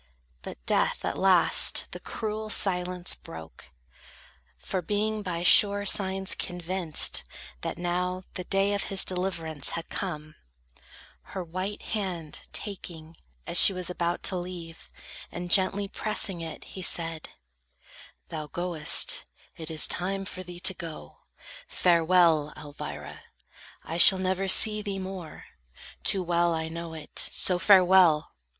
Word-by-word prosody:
But -, -, -8 dB
death -, -, 0 dB
at -, -, -2 dB
last 185 Hz, -3 st, +4 dB
the -, -, -7 dB
cruel 215 Hz, -1 st, -5 dB
silence 180 Hz, -3 st, 0 dB
broke; 80 Hz, -1 st, -12 dB, 0.9 s
For 180 Hz, -, -3 dB
being 210 Hz, +4 st, -2 dB
by 175 Hz, -4 st, -4 dB
sure 205 Hz, +2 st, +5 dB
signs 190 Hz, -1 st, +1 dB
convinced, 180 Hz, -2 st, 0 dB, 0.4 s
that -, -, -4 dB
now 180 Hz, +1 st, -2 dB
The 180 Hz, -, -6 dB
day 195 Hz, +1 st, +1 dB
of 200 Hz, -, -2 dB
his 195 Hz, -, +3 dB
deliverance 170 Hz, -5 st, -2 dB
had 165 Hz, -, -7 dB
come, 155 Hz, -5 st, -5 dB, 1.0 s
Her 185 Hz, -, -3 dB
white 185 Hz, +4 st, -5 dB
hand 180 Hz, -8 st, -4 dB
taking, 170 Hz, -5 st, -7 dB, 0.3 s
as 170 Hz, -, +2 dB
she 195 Hz, -, +9 dB
was 180 Hz, -1 st, -3 dB
about 175 Hz, -1 st, -2 dB
To 185 Hz, -, -2 dB
leave, 175 Hz, -2 st, -8 dB, 0.4 s
and 175 Hz, 0 st, -6 dB
gently 200 Hz, +1 st, +4 dB
pressing 195 Hz, -3 st, -3 dB
it, 165 Hz, -1 st, -7 dB
he 190 Hz, -, -9 dB
said: 165 Hz, -3 st, -3 dB, 1.0 s
"Thou 155 Hz, -2 st, -5 dB
goest; 175 Hz, -, +1 dB, 0.3 s
it 160 Hz, -2 st, -8 dB
is 160 Hz, -1 st, +3 dB
time 195 Hz, +2 st, -2 dB
for 185 Hz, -1 st, -5 dB
thee 175 Hz, -1 st, -9 dB
to 190 Hz, -, +4 dB
go; 165 Hz, -4 st, -10 dB, 0.5 s
Farewell, 170 Hz, -3 st, +3 dB
Elvira! 75 Hz, -, -8 dB, 0.6 s
I 165 Hz, -, -5 dB
shall 190 Hz, -, +8 dB
never 185 Hz, +1 st, -1 dB
see 210 Hz, +2 st, +5 dB
Thee 200 Hz, -2 st, -4 dB
more; 185 Hz, -4 st, -8 dB, 0.6 s
too 190 Hz, -2 st, +1 dB
well 170 Hz, -1 st, +1 dB
I 160 Hz, 0 st, -4 dB
know 165 Hz, 0 st, -7 dB
it; 155 Hz, -2 st, -5 dB
so, 180 Hz, -1 st, +2 dB
farewell! 180 Hz, -4 st, +5 dB
180 Hz, 130 wpm, -27 LUFS, 165-195 Hz, 1.0 s, she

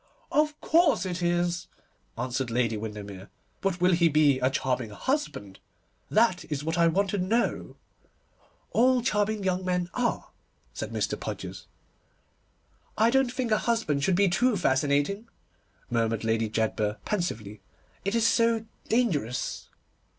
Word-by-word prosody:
'Of 300 Hz, 0 st, +1 dB
course 325 Hz, -, +3 dB
it 180 Hz, -1 st, -3 dB
is!' 175 Hz, 0 st, 0 dB, 0.5 s
answered 125 Hz, +1 st, -2 dB
Lady 115 Hz, -1 st, +1 dB
Windermere, 105 Hz, -3 st, -7 dB, 0.3 s
'but 190 Hz, -2 st, -1 dB
will 180 Hz, +1 st, +4 dB
he 170 Hz, -1 st, +4 dB
be 145 Hz, -3 st, +4 dB
a 130 Hz, 0 st, +2 dB
charming 130 Hz, -3 st, -1 dB
husband? 105 Hz, -, -3 dB, 0.5 s
That 215 Hz, -5 st, +3 dB
is 145 Hz, -1 st, -2 dB
what 160 Hz, +1 st, -1 dB
I 170 Hz, -1 st, +4 dB
want 195 Hz, +4 st, +1 dB
to 205 Hz, -, -1 dB
know.' 220 Hz, +6 st, 0 dB, 1.0 s
'All 250 Hz, +1 st, +3 dB
charming 210 Hz, -3 st, 0 dB
young 185 Hz, 0 st, 0 dB
men 180 Hz, -1 st, -1 dB
are,' 245 Hz, -1 st, -1 dB, 0.4 s
said -, -, -5 dB
Mr. -, -, -2 dB
Podgers. -, -, -6 dB, 1.3 s
'I 225 Hz, +2 st, +4 dB
don't 265 Hz, -1 st, +3 dB
think 250 Hz, -3 st, -2 dB
a 215 Hz, -, +4 dB
husband 220 Hz, -12 st, 0 dB
should 190 Hz, +1 st, +3 dB
be 200 Hz, +2 st, +4 dB
too 215 Hz, +5 st, +2 dB
fascinating,' 145 Hz, -, +1 dB, 0.6 s
murmured 115 Hz, -2 st, 0 dB
Lady 115 Hz, 0 st, +1 dB
Jedburgh 110 Hz, -1 st, -1 dB
pensively, 110 Hz, -, -3 dB, 0.4 s
'it 200 Hz, +3 st, -1 dB
is 230 Hz, -1 st, +3 dB
so 230 Hz, -1 st, +3 dB, 0.2 s
dangerous. 155 Hz, -, -1 dB
175 Hz, 135 wpm, -27 LUFS, -, 1.3 s, will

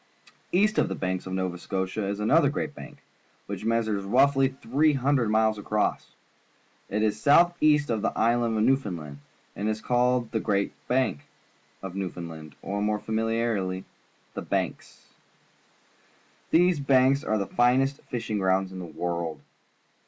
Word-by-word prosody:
East 210 Hz, +4 st, +3 dB
of -, -, +2 dB
the -, -, -3 dB
banks 95 Hz, 0 st, -3 dB
of 95 Hz, -, -5 dB
Nova 95 Hz, -2 st, -2 dB
Scotia 95 Hz, +2 st, -3 dB
is 100 Hz, +1 st, -3 dB
another 105 Hz, +1 st, +4 dB
great -, -, -3 dB
bank, -, -, -12 dB, 0.4 s
which -, -, -6 dB
measures 110 Hz, -3 st, 0 dB
roughly 135 Hz, +6 st, +3 dB
300 135 Hz, -1 st, +1 dB
miles 110 Hz, 0 st, +2 dB
across. 105 Hz, +1 st, -2 dB, 0.7 s
It 105 Hz, +2 st, 0 dB
is 105 Hz, -1 st, 0 dB
south 175 Hz, +4 st, +5 dB
east 150 Hz, -3 st, +3 dB
of 110 Hz, -2 st, -1 dB
the -, -, 0 dB
island 115 Hz, 0 st, +2 dB
of 105 Hz, -, +2 dB
Newfoundland, 90 Hz, -, -1 dB, 0.4 s
and 100 Hz, +3 st, -3 dB
so -, -, +2 dB
is 110 Hz, 0 st, -2 dB
called 125 Hz, 0 st, +1 dB
the 110 Hz, -, 0 dB
Grand 100 Hz, -2 st, 0 dB, 0.2 s
Bank 125 Hz, -, +1 dB, 0.6 s
of 95 Hz, -2 st, -6 dB
New 95 Hz, -1 st, -3 dB
foundland, 80 Hz, -3 st, -9 dB
or 100 Hz, +1 st, -3 dB
more 105 Hz, 0 st, +1 dB
familiarly, 110 Hz, -4 st, -1 dB, 0.5 s
"The -, -, -5 dB
Banks." -, -, -4 dB, 1.4 s
These 175 Hz, -1 st, +4 dB
banks 135 Hz, 0 st, +3 dB
are 110 Hz, -, 0 dB
the 100 Hz, -, -1 dB
finest 130 Hz, +5 st, +2 dB
fishing 115 Hz, -3 st, -3 dB
grounds 95 Hz, 0 st, +1 dB
in 95 Hz, -, -7 dB
the 90 Hz, -, -6 dB
world. 85 Hz, 0 st, -4 dB
110 Hz, 150 wpm, -26 LUFS, 95-130 Hz, 1.4 s, south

